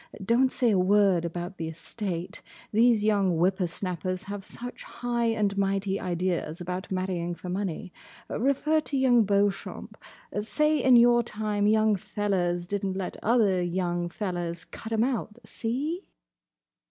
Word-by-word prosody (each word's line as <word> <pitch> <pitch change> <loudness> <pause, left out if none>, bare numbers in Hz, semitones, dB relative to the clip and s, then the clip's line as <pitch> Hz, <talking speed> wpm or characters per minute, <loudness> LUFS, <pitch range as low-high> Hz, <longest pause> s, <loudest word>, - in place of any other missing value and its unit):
Don't 250 +4 +3
say 240 -3 +2
a 195 - +3
word 190 -2 +4
about 175 +2 -5
the 165 - -3
estate. 180 +2 -5 0.3
These 225 0 +4
young 200 -5 +2
whipper 185 +2 +2
snappers 185 +1 -3
have 200 0 -6
such 245 +5 -8
high 240 -1 -2
and 210 -3 +1
mighty 195 0 0
ideas 175 -2 -2
about 180 +2 -5
marrying 185 -2 -2
for 180 - -8
money. 190 0 -3 0.3
Refer 280 +5 +1
to 295 -2 -3
young 245 -4 +4
Beauchamp. 200 0 -1 0.4
Say 300 +7 +1
in 255 -1 +6
your 240 0 +6
time 210 -2 -1
young 215 0 +4
fellers 180 -3 -1
did 200 +2 -3
n't 190 -1 -1
let 190 - -4
other 210 -6 +3
young 175 -1 -1
fellers 175 -3 -4
cut 225 - -9
'em 225 0 +2
out. 235 -3 -2
See?" 280 - -3
200 Hz, 145 wpm, -27 LUFS, 180-230 Hz, 0.4 s, in